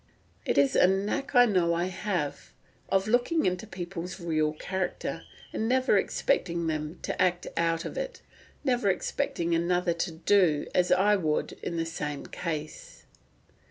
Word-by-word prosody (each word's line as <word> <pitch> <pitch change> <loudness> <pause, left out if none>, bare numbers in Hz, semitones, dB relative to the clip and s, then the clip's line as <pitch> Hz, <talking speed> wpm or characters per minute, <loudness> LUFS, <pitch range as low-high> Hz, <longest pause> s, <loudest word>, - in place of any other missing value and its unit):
It - - +1
is 140 -1 +4
a - - +6
"knack 200 +8 -1
I 245 0 +8
know 180 -6 +2
I 170 +1 0
have, 180 -5 -3 0.4
of 195 +1 +2
looking 245 +8 +2
into 180 +3 -1
people's 180 -1 -6
real 155 -3 0
character, 185 +4 -3 0.3
and 220 - -1
never 260 +1 +3
expecting 170 - 0
them 155 0 -3
to - - -2
act 180 -1 +2
out 165 0 0
of - - -4
it—never 280 - -3
expecting 170 -2 -1
another 175 +1 +1
to 170 +1 -2
do 165 -2 +3
as 180 -1 +2
I 205 +3 +4
would 155 -5 0
in 170 - -3
the 165 - 0
same 150 -3 -4
case." 155 -3 -6
180 Hz, 150 wpm, -28 LUFS, 165-200 Hz, 0.4 s, I